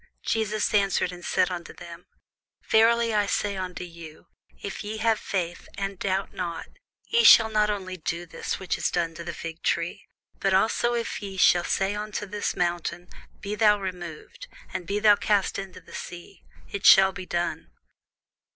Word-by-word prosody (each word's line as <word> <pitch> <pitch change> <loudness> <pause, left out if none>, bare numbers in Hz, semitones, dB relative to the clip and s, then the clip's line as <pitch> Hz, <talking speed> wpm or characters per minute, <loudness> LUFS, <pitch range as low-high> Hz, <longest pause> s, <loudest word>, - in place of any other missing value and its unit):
Jesus 215 -1 0
answered 195 -3 +2
and 175 -1 -10
said 185 +1 +1
unto 175 -2 -6
them, 170 0 -11 0.6
Verily 230 +1 +4
I 205 -1 +2
say 200 0 -1
unto 185 -1 -5
you, 165 -3 -11 0.3
If 200 - -6
ye 215 +1 -5
have 220 0 +2
faith, 175 -3 -4
and 195 -1 -4
doubt 195 0 -1
not, 170 -2 -4 0.4
ye 465 +1 +2
shall 225 - +8
not 210 -1 +2
only 185 -3 -3
do 170 +1 -4
this 165 - -4
which 190 -2 -3
is - - +1
done 170 -2 -1
to 170 +1 -8
the 170 - -4
fig 165 0 -7
tree, 170 +4 -2 0.3
but 195 -1 +2
also 235 +4 +2
if 235 -2 -3
ye 195 -2 -7
shall 175 -1 +5
say 195 +1 0
unto 210 0 -4
this 205 +1 -3
mountain, 175 0 -2 0.3
Be 200 - -4
thou 210 -1 +4
removed, 180 - -7 0.3
and 175 - -5
be 200 - -1
thou 210 -1 +5
cast 205 -3 +1
into 195 -2 -8
the - - -17
sea; 175 - -9 0.3
it - - -5
shall 195 0 +8
be 185 -1 -8
done. 175 - -2
195 Hz, 175 wpm, -26 LUFS, 175-210 Hz, 0.6 s, shall